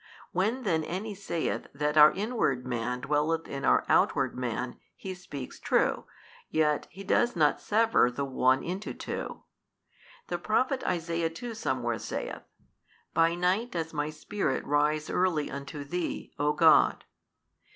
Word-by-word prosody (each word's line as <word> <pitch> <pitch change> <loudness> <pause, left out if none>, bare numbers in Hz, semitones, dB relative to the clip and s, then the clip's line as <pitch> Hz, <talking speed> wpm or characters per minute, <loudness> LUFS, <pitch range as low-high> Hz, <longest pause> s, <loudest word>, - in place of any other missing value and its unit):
When 220 +8 0
then 160 -7 +1
any 195 +7 -4
saith 185 -4 -3
that 150 +1 0
our 150 0 +9
inward 195 - -1
man 125 0 -2
dwelleth 150 +3 0
in 140 0 -5
our - - +4
outward - - +2
man, 125 0 -3 0.2
he 190 - -6
speaks 145 -7 -8
true, - - +1 0.4
yet 150 -1 +1
he 195 - -10
does 240 +4 +2
not 150 -3 +3
sever 225 - +3
the 140 +3 -3
one 130 -1 +2
into 185 +4 -4
two. - - -5 0.8
The 175 - -3
Prophet 255 +7 +1
Isaiah 170 -2 0
too 230 +9 -7
somewhere 120 - -2
saith, - - -5 0.7
By 165 +1 +3
night 185 +7 +1
does 165 -2 -3
my 150 0 -1
spirit 155 -1 -2
rise 150 +1 +1
early 180 -5 0
unto 140 +1 -6
Thee, 175 +4 -4
O 145 +1 +3
God. 165 -1 +5
160 Hz, 140 wpm, -29 LUFS, 140-185 Hz, 0.8 s, our